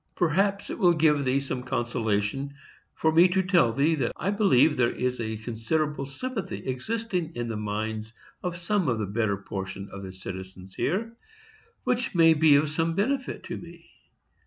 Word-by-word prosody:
Perhaps 195 +4 +1
it - - -5
will 175 -2 +5
give 150 -3 +3
thee 130 +1 +2
some 135 -2 -4
consolation 120 +2 -1 0.4
for 160 - +2
me 170 +3 +7
to 190 +1 +1
tell 175 -10 +4
thee 140 +7 +2
that 135 -7 0
I 195 - -1
believe 190 - +4
there 120 -2 +3
is 125 0 -2
a 110 -1 -3
considerable 135 +6 -2
sympathy 210 - -5
existing 180 - -2
in 120 -1 -3
the 115 - -3
minds 110 +1 -3 0.3
of 180 -1 -3
some 180 0 0
of 120 -3 +1
the 110 - -1
better 100 0 0
portion 100 0 -6
of 100 - -7
the 95 -1 -7
citizens 95 0 -8
here, 220 +8 -1 0.7
which 250 -5 0
may 165 -1 +7
be 155 -1 +5
of 145 +1 +2
some 165 +2 0
benefit 260 +6 -1
to - - -5
me. 170 0 -13
145 Hz, 175 wpm, -27 LUFS, 110-175 Hz, 0.7 s, me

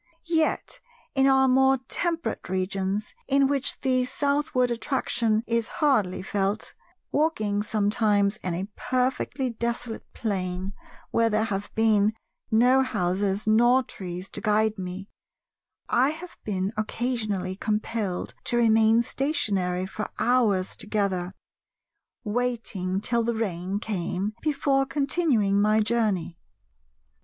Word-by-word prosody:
Yet 325 -2 0 0.3
in 270 -1 +4
our 265 0 +5
more 265 +1 +4
temperate 335 - -2
regions, 190 +2 -2
in 275 0 +4
which 280 0 0
the 255 -2 +2
southward 280 -2 0
attraction 230 -2 0
is 230 -1 0
hardly 240 - +2
felt, 200 +2 -1 0.4
walking 215 -10 +1
sometimes 210 -1 +1
in 180 -2 -3
a 190 +3 -3
perfectly 255 +1 -1
desolate 235 0 -4
plain 190 -3 -3 0.4
where 230 0 +3
there 215 0 +1
have 205 -3 -3
been 215 -1 +3 0.4
no 245 +4 +5
houses 195 -4 0
nor 240 +4 +4
trees 180 -4 -7
to 205 - -6
guide 215 0 +2
me, 185 +1 -6 0.8
I 260 +3 +3
have 330 +3 -7
been 195 0 -2
occasionally 215 -4 -2
compelled 210 -2 -2
to 240 - +1
remain 225 0 +4
stationary 195 - 0
for 215 +2 -5
hours 220 -7 +2
together, 195 -4 -2 0.9
waiting 215 -5 -2
till 235 +2 +1
the 235 0 -1
rain 190 -3 -2
came 200 -1 -2
before 275 -3 +1
continuing 265 - +2
my 215 +1 +3
journey. 210 -6 0
220 Hz, 115 wpm, -26 LUFS, 195-255 Hz, 0.9 s, our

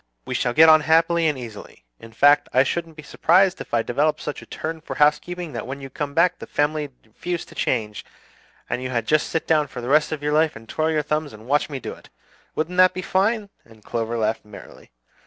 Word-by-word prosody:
We - - -4
shall 120 - 0
get 160 +1 +8
on 155 -1 +7
happily 165 +2 +3
and 150 -3 0
easily; 115 - -10
in 115 - -13
fact, 145 +5 +4
I 130 - +4
shouldn't 165 +3 -3
be 155 - -9
surprised 185 +5 +2
if - - -9
I 115 -1 +1
developed 150 +6 0
such 150 - -5
a - - -14
turn 160 0 -5
for - - -7
housekeeping, 155 +2 +1
that 115 - -5
when 135 +2 -6
you 135 -1 -9
come 140 +1 -5
back 180 +2 +3
the - - -9
family 150 0 -1 0.2
refused 175 +10 -5
to - - -13
change, 105 -4 -2 0.6
and 125 - -3
you 130 - -4
had 120 -3 -1
just 155 0 +2
to - - -8
sit 155 -3 +1
for - - -8
the 120 +1 -5
rest 150 +2 +3
of 150 -2 -4
your 150 0 0
life 155 0 +2
and 115 0 -12
twirl 155 +7 -1
your 155 -2 0
thumbs 150 0 -2
and 110 +1 -13
watch 145 +4 +1
me 140 -3 -5
do - - -6
it! - - -17 0.5
Wouldn't 165 +4 -2
that 185 0 +5
be 185 - -4
fine?" 200 +3 0
and 110 -2 -20
Clover 115 0 -2
laughed 110 0 -1
merrily. 105 -1 -14
150 Hz, 235 wpm, -22 LUFS, 125-160 Hz, 0.6 s, get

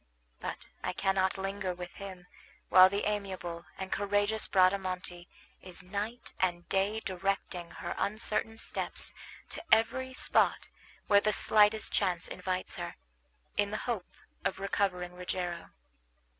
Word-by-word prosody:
But - - -5 0.2
I - - -1
cannot 190 0 +1
linger 195 -1 -2
with 180 0 -7
him 190 -3 -9 0.4
while 185 +1 +9
the 200 +1 -1
amiable 190 -5 -3
and 190 0 -5
courageous 205 +2 +2
Bradamante 185 -2 +1 0.3
is 185 0 -7
night 205 +6 -4
and 175 -2 0
day 200 +3 +1
directing 185 -2 -2
her - - -5
uncertain 215 +1 0
steps - - -3 0.4
to - - -6
every 260 +4 +3
spot - - +2 0.4
where 205 -1 +6
the 215 +1 +2
slightest 215 +1 +5
chance 180 -4 +1
invites 185 0 -3
her, - - -5 0.6
in 205 0 +3
the 215 - -2
hope 225 -7 -2 0.3
of - - 0
recovering 185 -2 0
Rogero. 180 -1 -3
195 Hz, 130 wpm, -31 LUFS, 180-205 Hz, 0.6 s, while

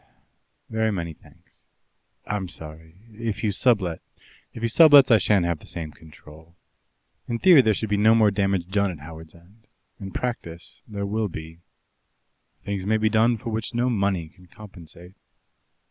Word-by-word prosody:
"Very 110 0 -1
many 85 -5 -4
thanks. - - -22 0.6
I'm 100 -3 -4
sorry 80 +1 -10 0.2
if 110 -1 -5
you 105 - +1
sublet 100 -6 +1 0.3
?" - - -29
"If 115 - -8
he - - +2
sublets, 145 +1 +7
I 110 - +6
shan't 95 -1 +2
have 85 -2 -2
the - - -14
same 80 -2 -6
control. 80 +1 -17 0.7
In 120 - -2
theory 170 +2 +7
there 110 -4 +1
should 110 - -3
be 105 - +2
no 110 +2 +5
more 110 -2 +4
damage 95 -3 0
done 100 +1 0
at 90 - -7
Howards 80 0 -11
End; 100 +6 -22 0.3
in 95 - -7
practice 85 -8 -6
there 100 -2 -5
will 105 +2 -1
be. 80 -2 -9 1.1
Things 100 -2 -3
may 110 +3 +1
be 110 0 +1
done 115 +2 +2
for 115 +1 -6
which 110 +2 -4
no 125 +1 +1
money 100 -7 -1
can 90 +2 -21
compensate. 90 -2 -14
100 Hz, 170 wpm, -24 LUFS, 85-110 Hz, 1.1 s, sublets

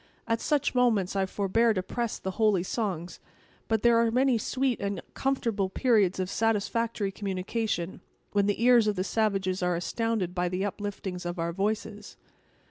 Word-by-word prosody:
At 230 0 0
such 295 -3 +1
moments 225 -7 +2
I 195 -1 +1
forbear 215 +4 +2
to 185 - -1
press 235 +4 -3
the 190 - -4
holy 205 -5 +4
songs; 185 -5 -3 0.5
but 220 -2 0
there 235 -1 +5
are 230 0 +3
many 250 0 +2
sweet 255 +2 0
and 200 0 -2
comfortable 230 -8 0
periods 205 -4 +2
of 185 - 0
satisfactory 225 0 0
communication, 195 -1 -3 0.3
when 200 -1 +2
the 205 +2 0
ears 240 -3 +6
of 210 - +1
the 185 - -1
savages 195 -3 0
are 180 -1 +1
astounded 195 0 -1
with 180 -1 0
the 185 +1 -1
upliftings 200 -2 -4
of 175 +1 -4
our 170 0 -2
voices." 210 +2 -3
205 Hz, 165 wpm, -28 LUFS, 185-230 Hz, 0.5 s, ears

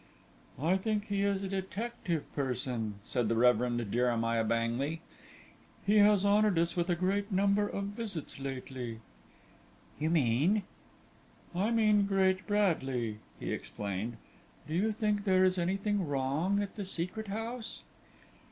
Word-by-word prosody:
"I 170 +7 +2
think 210 +1 -2
he 200 -1 0
is 200 -1 +1
a - - -2
detective 195 -2 -3
person," 125 -5 -2
said 120 -1 0
the 115 - +2
Reverend 120 -2 +2
Jeremiah 115 -1 +1
Bangley; 115 +7 0 0.9
"he 210 +1 +5
has 205 -1 +5
honoured 205 -2 +4
us 170 0 +1
with 175 0 0
a 175 - +3
great 200 +4 0
number 200 +2 +3
of 200 - -3
visits 205 - -5
lately." 130 -3 -5 1.0
"You 155 +1 +1
mean 160 - +3 0.5
?" - - -30
"I 195 +5 +1
mean 215 -3 +4
Great 190 -1 +2
Bradley," 135 - 0 0.2
he - - -3
explained. 105 +3 -4 0.5
"Do 155 - -5
you 205 +6 +2
think 210 -1 0
there 185 -2 +4
is 185 0 +2
anything 195 +1 0
wrong 145 +9 0
at 200 +2 -8
the 205 - -3
Secret 185 +4 -3
House?" 225 +3 -5
185 Hz, 140 wpm, -32 LUFS, 130-205 Hz, 1.0 s, he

